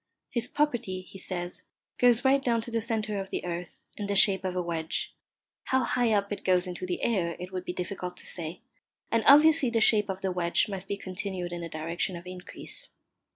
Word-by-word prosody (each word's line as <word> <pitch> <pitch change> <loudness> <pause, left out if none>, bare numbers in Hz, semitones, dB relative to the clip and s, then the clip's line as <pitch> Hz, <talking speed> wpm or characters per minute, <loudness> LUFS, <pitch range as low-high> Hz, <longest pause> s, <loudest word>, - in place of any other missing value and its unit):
His 240 0 -1
property, 240 -11 -1
he 190 +1 -12
says, 175 -1 -3 0.4
goes 245 +1 +4
right 270 +1 +4
down 235 -2 +2
to 235 - -7
the 230 0 0
centre 215 -2 -1
of 195 0 -5
the - - -3
earth, 175 0 -5 0.2
in 205 - -4
the 200 - -1
shape 195 -1 +5
of 185 -1 -2
a 180 - +1
wedge; 165 -1 -2 0.5
how 260 0 +2
high 240 -1 +1
up 200 -1 +1
it 205 - -4
goes 180 -1 +3
into 180 0 -5
the 180 - -3
air 180 -7 +1
it 180 +1 -7
would 185 -1 -4
be - - -2
difficult 180 0 -5
to - - -8
say, 170 +3 -4 0.5
and 230 -1 +2
obviously 295 -1 +7
the 230 -1 +1
shape 210 -2 +4
of 190 0 -3
the 190 - -1
wedge 175 -1 +2
must 195 -2 -5
be 200 - -2
continued 185 -2 -4
in 175 - -4
the 170 - -5
direction 165 +4 -2
of 170 +1 -9
increase. 185 - -5
190 Hz, 215 wpm, -28 LUFS, 180-230 Hz, 0.5 s, obviously